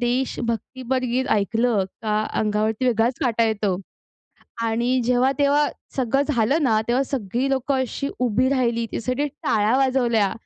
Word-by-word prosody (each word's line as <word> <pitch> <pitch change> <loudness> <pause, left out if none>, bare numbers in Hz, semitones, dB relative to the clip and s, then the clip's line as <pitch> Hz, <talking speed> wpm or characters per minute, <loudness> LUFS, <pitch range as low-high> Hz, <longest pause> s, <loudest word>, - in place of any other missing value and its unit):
देश 245 +2 -1
भक्तीपर 255 +3 -2
गीत 250 +2 0
ऐकलं 220 0 +1 0.2
का 215 -1 0 0.2
अंगावरती 215 +2 0
वेगळाच 235 +1 +2
काटा 230 -1 +2
येतो. 205 -4 0 0.9
आणि 235 +3 +1
जेव्हा 250 +2 +3
तेव्हा 290 +1 +3 0.3
सगळं 270 +1 +1
झालं 275 +4 +2
ना, 220 -5 +3
तेव्हा 245 +3 +2
सगळी 250 0 -2
लोकं 270 +1 0
अशी 270 +2 -3
उभी 250 +1 +2
राहिली. 235 -4 +1
त्यासाठी 255 +5 -2
टाळ्या 225 -4 0
वाजवल्या. 245 -6 +2
245 Hz, 140 wpm, -23 LUFS, 220-260 Hz, 0.9 s, जेव्हा